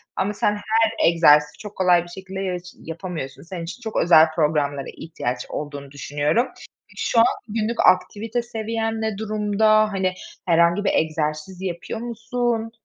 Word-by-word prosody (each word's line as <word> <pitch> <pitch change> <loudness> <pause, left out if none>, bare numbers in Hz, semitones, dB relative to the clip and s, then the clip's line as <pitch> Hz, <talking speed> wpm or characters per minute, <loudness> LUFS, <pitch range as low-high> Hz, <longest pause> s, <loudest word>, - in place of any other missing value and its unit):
ama 200 +2 -1
sen 205 - +1
her 220 0 +1
egzersizi, 150 -3 +4
çok 210 -1 -10
kolay 180 -2 +4
bir - - -14
şekilde 190 +1 -8
yaş 180 -2 -2 0.2
yapamıyorsun. 160 -6 -6
Senin 170 0 -7
için 180 +9 -8
çok 220 -2 -6
özel 160 -2 +6
programlara 145 -3 0
ihtiyaç 125 -6 -4
olduğunu 145 -2 -6
düşünüyorum. 145 - 0 0.5
Şu 230 - +1
an 230 - +7 0.2
günlük 225 +2 -2
aktivite 215 +6 +2
seviyen 225 -1 -3
ne 220 -2 -2
durumda? 215 0 +2
Hani, 190 -2 0 0.3
herhangi 170 +3 +3
bir - - +1
egzersiz 155 +3 -1
yapıyor 185 +4 -4
musun? 235 -1 -2
190 Hz, 145 wpm, -22 LUFS, 160-220 Hz, 0.5 s, an